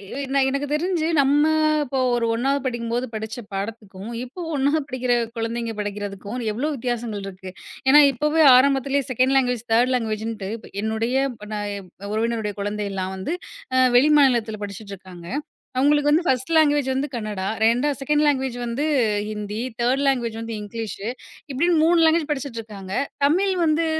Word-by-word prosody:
ஏ 280 Hz, -, -3 dB
நா 275 Hz, -, +3 dB
எனக்குத் 280 Hz, +1 st, -2 dB
தெரிஞ்சு 335 Hz, 0 st, 0 dB
நம்ம 280 Hz, +2 st, +4 dB, 0.4 s
இப்போ 270 Hz, -1 st, -2 dB, 0.2 s
ஒரு 235 Hz, -1 st, 0 dB
1ணாவது 270 Hz, +4 st, 0 dB
படிக்கும் 235 Hz, -2 st, -3 dB
போது 245 Hz, +2 st, 0 dB
படிச்ச 220 Hz, +2 st, -5 dB, 0.2 s
பாடத்துக்கும், 200 Hz, 0 st, -6 dB
இப்போ 265 Hz, +9 st, -9 dB
1ணாவது 285 Hz, +3 st, +2 dB
படிக்கிற 255 Hz, -2 st, -1 dB, 0.2 s
குழந்தைங்க 230 Hz, 0 st, -2 dB
படிக்கிறதுக்கும் 205 Hz, +2 st, -5 dB
எவ்ளோ 265 Hz, +8 st, -1 dB
வித்தியாசங்கள் 235 Hz, -5 st, -3 dB
இருக்கு. 185 Hz, -1 st, -9 dB, 0.4 s
ஏன்னா 295 Hz, +2 st, +9 dB
இப்பவே 300 Hz, +5 st, +2 dB
ஆரம்பத்துலயே 275 Hz, +1 st, +2 dB
செக்கண்டு 255 Hz, +2 st, +2 dB
லாங்குவேஜ் 245 Hz, -3 st, 0 dB
தேர்டு 245 Hz, +3 st, +3 dB
லாங்குவேஜ்ன்ட்டு 220 Hz, -3 st, -3 dB
இப் 230 Hz, -, -14 dB, 0.2 s
என்னுடைய 220 Hz, +3 st, -1 dB, 0.2 s
இப்போ 210 Hz, -3 st, -11 dB
நா 210 Hz, -, -2 dB, 0.5 s
உறவினருடைய 220 Hz, -2 st, -1 dB
குழந்தை 205 Hz, 0 st, -2 dB
எல்லாம் 190 Hz, 0 st, -3 dB
வந்து 290 Hz, -, -3 dB, 0.4 s
அ 255 Hz, -, +6 dB
வெளி 300 Hz, +4 st, +5 dB
மாநிலத்துல 235 Hz, -6 st, +2 dB
படிச்சிட்டு 200 Hz, 0 st, -9 dB
இருக்காங்க. 180 Hz, -2 st, -12 dB, 0.5 s
அவங்களுக்கு 290 Hz, +2 st, +3 dB
வந்து 330 Hz, +3 st, +3 dB
பஸ்ட் 260 Hz, +3 st, 0 dB
லாங்குவேஜ் 295 Hz, -3 st, +4 dB
வந்து 265 Hz, +2 st, -1 dB
கன்னடா 215 Hz, -4 st, -4 dB, 0.2 s
2ஆ 240 Hz, +6 st, +3 dB
செக்கண்டு 295 Hz, +2 st, +1 dB
லாங்குவேஜ் 265 Hz, -3 st, 0 dB
வந்து 240 Hz, +5 st, -2 dB, 0.4 s
ஹிந்தி 210 Hz, 0 st, -5 dB, 0.2 s
தேர்டு 250 Hz, +3 st, +2 dB
லாங்குவேஜ் 235 Hz, -4 st, 0 dB
வந்து 230 Hz, 0 st, -5 dB
இங்கிலீஷு. 215 Hz, -1 st, -6 dB, 0.4 s
இப்படி 275 Hz, +6 st, +1 dB, 0.2 s
மூணு 335 Hz, +1 st, +4 dB
லாங்குவேஜ் 320 Hz, -1 st, +3 dB
படிச்சிட்டு 270 Hz, -5 st, -3 dB
இருக்காங்க. 195 Hz, -3 st, -9 dB, 0.3 s
தமிழ் 375 Hz, +7 st, +2 dB
வந்து 320 Hz, +1 st, +2 dB
245 Hz, 155 wpm, -23 LUFS, 215-280 Hz, 0.5 s, ஏன்னா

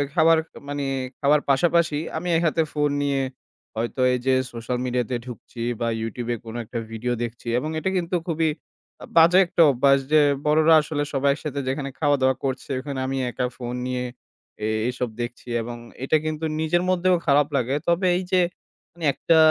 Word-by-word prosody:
খাবার 165 Hz, -1 st, +5 dB, 0.3 s
মানে 145 Hz, 0 st, -3 dB, 0.3 s
খাবার 150 Hz, +1 st, +4 dB
পাশাপাশি 165 Hz, +2 st, +3 dB, 0.2 s
আমি 175 Hz, +3 st, -4 dB
এক -, -, 0 dB
হাতে 160 Hz, +1 st, +2 dB
ফোন 150 Hz, -1 st, +1 dB
নিয়ে 140 Hz, -1 st, +1 dB, 0.5 s
হয়তো 115 Hz, +3 st, -2 dB
এই 125 Hz, -, 0 dB
যে 130 Hz, -, +5 dB, 0.2 s
সোশ্যাল 115 Hz, +1 st, -3 dB
মিডিয়াতে 125 Hz, 0 st, -1 dB
ঢুকছি 120 Hz, -1 st, -9 dB, 0.2 s
বা 115 Hz, -, +1 dB
YouTube-এ 120 Hz, +2 st, -3 dB
কোন 115 Hz, 0 st, -8 dB
একটা 115 Hz, +2 st, -4 dB
ভিডিও 120 Hz, +2 st, -2 dB
দেখছি 120 Hz, 0 st, -7 dB
এবং 155 Hz, -, -4 dB
এটা 190 Hz, -, -1 dB
কিন্তু 180 Hz, 0 st, -1 dB
খুবই 160 Hz, -1 st, +1 dB, 0.5 s
আ -, -, -6 dB
বাজে 165 Hz, +2 st, +7 dB
একটা 170 Hz, -, +1 dB
অভ্যাস 140 Hz, +2 st, +4 dB
যে 155 Hz, -1 st, +6 dB, 0.2 s
বড়রা 155 Hz, +2 st, +5 dB
আসলে 150 Hz, 0 st, -2 dB
সবাই 140 Hz, 0 st, +2 dB
একসাথে 145 Hz, -1 st, -5 dB
যেখানে 135 Hz, +1 st, -2 dB
খাওয়া-দাওয়া 140 Hz, -3 st, +3 dB
করছে, 130 Hz, 0 st, -3 dB
ওখানে 140 Hz, 0 st, -5 dB
আমি 135 Hz, 0 st, -2 dB
একা 125 Hz, +2 st, -2 dB
ফোন 120 Hz, -1 st, -5 dB
নিয়ে 125 Hz, 0 st, -2 dB, 0.6 s
এ -, -, +1 dB, 0.2 s
এইসব 125 Hz, -1 st, -2 dB
দেখছি 120 Hz, +1 st, -6 dB
এবং 120 Hz, +1 st, -6 dB, 0.3 s
এটা 145 Hz, +4 st, +3 dB
কিন্তু 155 Hz, 0 st, -2 dB
নিজের 165 Hz, +3 st, +1 dB
মধ্যেও 185 Hz, 0 st, +3 dB
খারাপ 145 Hz, 0 st, +4 dB
লাগে। 130 Hz, 0 st, +1 dB
তবে 170 Hz, +2 st, +2 dB
এই 185 Hz, -, -2 dB
যে 185 Hz, -1 st, +4 dB, 0.5 s
মানে 170 Hz, -2 st, -6 dB
একটা 165 Hz, +4 st, +2 dB
140 Hz, 175 wpm, -24 LUFS, 125-160 Hz, 0.6 s, বাজে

